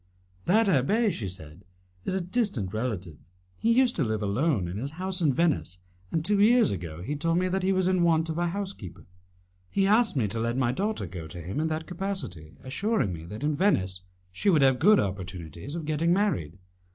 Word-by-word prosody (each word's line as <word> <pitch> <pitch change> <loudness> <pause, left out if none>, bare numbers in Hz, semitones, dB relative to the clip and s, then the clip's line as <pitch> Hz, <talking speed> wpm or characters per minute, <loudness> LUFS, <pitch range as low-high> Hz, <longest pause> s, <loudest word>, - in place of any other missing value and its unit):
"That 220 +5 +4
abbé," 200 - +2
she 105 - -4
said, 85 -1 -9 0.4
"is 185 - -1
a 190 - 0
distant 175 - -1
relative. 105 -9 -3 0.4
He 230 - +2
used 250 +1 +3
to 150 - +2
live 110 -2 -1
alone 105 - +1
in 90 +3 -5
his 135 +7 -4
house 185 +2 -3
in 155 -4 +4
Venice, 150 - 0 0.3
and 160 -1 -1
two 200 +1 +2
years 235 +3 +5
ago 85 -3 -5
he 145 +9 -3
told 165 +3 0
me 185 +1 +2
that 190 +1 0
he 190 +1 +1
was 185 -1 +2
in 185 -1 +2
want 165 -1 +3
of 160 +1 -3
a 175 - +1
housekeeper. 190 - -6 0.6
He 195 - +1
asked 220 +1 +3
me 120 -6 +1
to 115 - -3
let 115 +2 -1
my 125 -2 +2
daughter 205 - -2
go 85 -2 -7
to 85 +3 -9
him 90 - -4
in 160 - +1
that 160 0 -3
capacity, 175 - -5
assuring 175 - 0
me 80 -1 -8
that 105 +9 -7
in 150 0 +1
Venice 95 - +1 0.3
she 200 - 0
would 155 -7 +5
have 130 -2 +4
good 205 +6 +6
opportunities 95 - -5
of 165 -2 -4
getting 155 +2 +1
married. 175 - 0
150 Hz, 210 wpm, -27 LUFS, -, 0.6 s, good